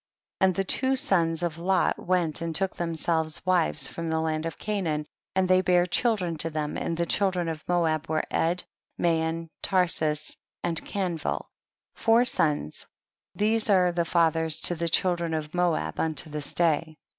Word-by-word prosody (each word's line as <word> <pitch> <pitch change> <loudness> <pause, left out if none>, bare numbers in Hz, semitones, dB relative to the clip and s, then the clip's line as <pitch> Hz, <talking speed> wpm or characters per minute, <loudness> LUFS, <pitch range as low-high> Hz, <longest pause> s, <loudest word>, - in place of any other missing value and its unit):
And 190 -2 +3
the 195 - 0
two 260 +7 +1
sons 175 - +1
of 165 -2 -2
Lot 185 +1 +1
went 175 -4 0
and 165 -1 -3
took 195 +1 0
themselves 160 -1 -2
wives 180 -3 +2
from 165 -1 -5
the 160 0 0
land 160 0 -1
of 165 - -7
Canaan, 170 -8 -2 0.3
and 190 -1 +2
they 185 0 +4
bare 180 -1 +3
children 180 -5 0
to 165 - -2
them, 150 -1 -3
and 165 - -3
the 170 - 0
children 185 -1 0
of 160 -2 -4
Moab 165 -3 +1
were 155 0 0
Ed, 175 +2 0 0.4
Mayon, 165 -1 0
Tarsus, 160 -5 +1 0.3
and 170 -2 0
Kanvil, 180 -5 -3 0.5
four 230 +2 +3
sons, 150 - 0 0.5
these 215 +1 +2
are 180 -3 +4
fathers 160 -2 +2
to - - +5
the 170 0 -2
children 170 -1 +1
of 155 -1 -5
Moab 170 - 0
unto 160 0 -1
this 150 -1 -3
day. 160 -2 +1
170 Hz, 160 wpm, -26 LUFS, 160-185 Hz, 0.5 s, to